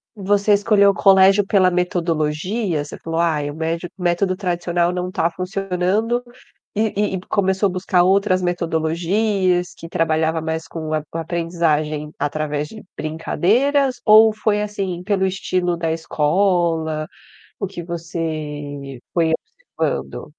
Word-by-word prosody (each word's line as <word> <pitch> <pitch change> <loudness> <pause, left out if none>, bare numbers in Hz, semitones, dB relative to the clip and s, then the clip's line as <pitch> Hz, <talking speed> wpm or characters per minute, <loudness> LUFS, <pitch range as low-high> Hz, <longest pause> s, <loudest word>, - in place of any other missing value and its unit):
Você 205 +1 +2
escolheu 200 -1 +4
o - - -5
colégio 195 +1 +5
pela 190 -2 +3
metodologia? 175 +1 -1
Você - - -9
falou: 165 0 -3
"Ai, 155 -4 +1
o 145 - -10
médio 165 +2 -3
o 180 - -7
método 180 +2 +1
tradicional 175 -2 0
não 180 0 -3
tá 180 -4 +1
funcionando.", 195 +5 -1 0.5
e 210 -2 0
e - - -3
começou 190 0 +2
a - - -3
buscar 180 -1 +2
outras 190 0 +3
metodologias, 180 +2 0
que 165 - -9
trabalhava 160 0 +1
mais 160 +1 -3
com 160 -1 -5
a 155 - 0
com - - -4
aprendizagem, 160 -3 -1
através 150 0 -2
de 220 +6 -11
brincadeiras, 245 - +1
ou 220 0 +7
foi 210 -1 0
assim, 195 -4 -3
pelo 195 0 +1
estilo 185 -2 -1
da 165 -1 -1
escola, 160 -1 0 0.5
o 200 - -2
que 185 -2 -7
você 155 -5 -5
foi 165 -2 +2 0.4
observando? - - -2
175 Hz, 135 wpm, -20 LUFS, 160-195 Hz, 0.5 s, ou